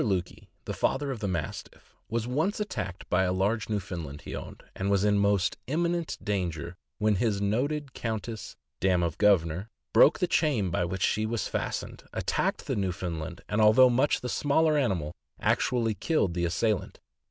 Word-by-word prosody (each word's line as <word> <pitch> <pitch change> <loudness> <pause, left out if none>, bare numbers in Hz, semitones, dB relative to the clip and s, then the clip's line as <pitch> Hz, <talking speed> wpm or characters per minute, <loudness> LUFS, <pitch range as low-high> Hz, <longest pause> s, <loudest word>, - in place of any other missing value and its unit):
Lukey, 95 -4 -2 0.2
the - - -3
"Father 140 +1 0
of 125 - -5
the 100 - -2
Mastiff," 85 -6 -5 0.2
was 115 0 -1
once 155 - 0
attacked 185 - -4
by 90 - +2
a 90 -1 +2
large 100 +4 0
Newfoundland 85 -8 -4
he - - -6
owned, - - -8
and 95 +1 -2
was 100 -1 +3
in 105 -1 +3
most 100 -1 +2
imminent 170 +3 -1
danger, 90 -4 -2 0.2
when 105 -1 +2
his 105 -2 +1
noted 135 +8 -1
Countess 110 -1 -4 0.2
(dam 90 -2 +2
of 85 -2 -2
Governor) 95 -1 +3 0.2
broke 150 0 +7
the 180 - +1
chain 130 - +1
by 85 - +1
which 90 +2 -3
she 110 0 +1
was 115 0 -1
fastened, - - -4
attacked - - -1
the - - -1
Newfoundland, 90 -4 -3
and 105 +1 +1
although 120 +4 +7
much 130 +4 +2
the 125 - -3
smaller 155 +4 +2
animal, 95 - 0 0.3
actually 115 -2 +1
killed 105 - 0
the 85 0 0
assailant. 100 +4 -1
105 Hz, 170 wpm, -28 LUFS, 90-125 Hz, 0.3 s, broke